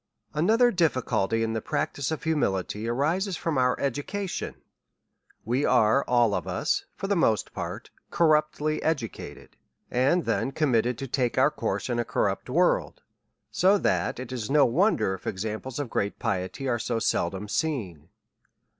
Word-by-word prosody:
ANOTHER 225 +10 +4
difficulty 130 - +1
in 110 0 -1
the 110 - -2
practice 140 +4 -2
of 160 - -4
humility, 110 - -1
arises 165 - 0
from 165 -2 -2
our 125 0 +2
education. 145 +8 -3 0.9
We 125 +6 0
are 125 +1 +4
all 120 -4 +3
of 90 -3 -2
us^ 90 -1 -1
for - - -5
the 200 +1 +1
most 110 - +1
part, - - -6 0.2
corruptly 155 -2 +2
educated, 140 -8 -4 0.3
and 140 +8 +2
then 135 - 0
committed 125 -5 +1
to 135 - -5
take 125 -1 -1
our 135 +3 +4
course - - -2
in 120 -2 -1
a - - +2
corrupt - - -1
w - - +3
orld; - - +1 0.6
so 195 +3 +4
that 190 - 0
it 130 -1 -7
is 120 -4 -4
no 145 0 +5
wonder, 165 - +2
if 95 - -8
examples 110 +6 -4
of 145 -2 -2
great 100 0 -1
piety 95 +8 -3
are 120 -2 0
so 115 +1 -1
seldom 105 -2 -1
seen. 100 - -3
130 Hz, 155 wpm, -26 LUFS, 110-155 Hz, 0.9 s, no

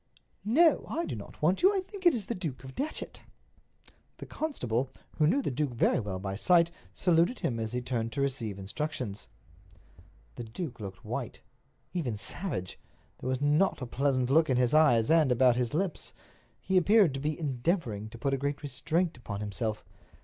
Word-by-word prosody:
"No, 305 +9 +4
I 335 +3 -1
do - - -4
not 105 +7 -10
want 175 +5 +3
you. 390 +2 +5
I - - +2
think 380 0 -2
it 335 - +5
is 215 -5 -3
the 235 - -2
Duke 155 - -5
of 130 0 -9
Datchet." 300 - -4 1.0
The - - -8
constable, 130 - -2 0.3
who 150 - +5
knew 275 - +2
the - - -1
duke 135 -1 -2
very 115 - +3
well 100 -5 -3
by 95 +1 -4
sight, 170 - +4 0.2
saluted 175 +6 +2
him 115 -3 -1
as 110 0 -3
he 125 - -1
turned 115 -2 -2
to 140 - -1
receive 130 -7 -2
instructions. 105 +1 -4 1.1
The - - -4
duke 120 +3 -6
looked 95 -2 -8
white, 120 +2 -5 0.5
even 145 - -1
savage. 115 - -4 0.4
There 130 - -4
was 130 +1 -1
not 150 +6 +3
a 125 - -4
pleasant 130 0 0
look 155 +1 +4
in 130 - +3
his 125 +1 +2
eyes 145 -6 +5
and 160 -5 +5
about 125 0 +5
his 120 -1 0
lips. 175 +2 -2 0.5
He 190 0 +1
appeared 195 -3 +5
to 135 - -3
be 150 +3 -2
endeavoring 130 - -1
to 115 - -11
put 135 +3 -1
a - - +2
great 140 +2 -2
restraint 155 +4 -1
upon 100 -4 -6
himself. 105 +1 -3
135 Hz, 185 wpm, -30 LUFS, 120-170 Hz, 1.1 s, you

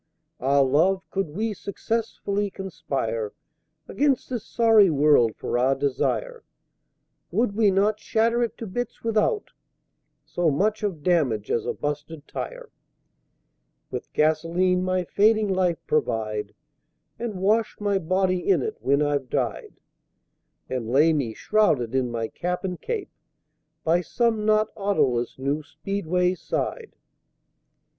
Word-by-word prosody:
Ah, 140 +2 +3
Love, 165 +8 +2
could 195 -4 -1
we 215 +8 -2
successfully 205 0 -2
conspire 140 - -3 0.5
Against 275 +2 0
this 240 -4 -3
sorry 225 -5 +5
World 145 -7 +4
for 120 - -2
our 130 +2 +3
desire, 145 - -1 0.9
Would 230 -2 +1
we 215 -2 +4
not 205 +2 +2
shatter 230 +3 +1
it 235 - -1
to 230 - -6
bits 235 +4 -5
without 230 - 0 0.7
So 175 -2 0
much 210 +9 +1
of 185 -8 -3
damage 140 - +1
as 115 - 0
a - - 0
busted 150 +1 -5
tire? - - -6 1.2
With - - -6
Gasoline 165 +4 +2
my 185 0 0
fading 215 +3 +3
Life 185 -3 +1
provide, 110 -7 -1 0.6
And 230 -3 -3
wash 210 +4 +1
my 200 -2 +1
Body 185 +1 +1
in 390 - +4
it 435 -1 -4
when 140 +2 +2
I've 145 -3 -1
died, - - -3 0.9
And 125 -3 -3
lay 150 +6 +4
me, 125 -8 -1
shrouded 145 - +1
in 130 -2 +1
my 115 -1 -2
Cap 180 - -3
and 180 -2 -4
Cape, 455 -4 -4 0.7
By 170 +2 +3
some 225 +2 0
not 215 0 +3
Autoless 135 - 0
new 140 +3 -1
Speedway's 180 +2 -1
side. 455 -3 -3
185 Hz, 130 wpm, -25 LUFS, 145-215 Hz, 1.2 s, sorry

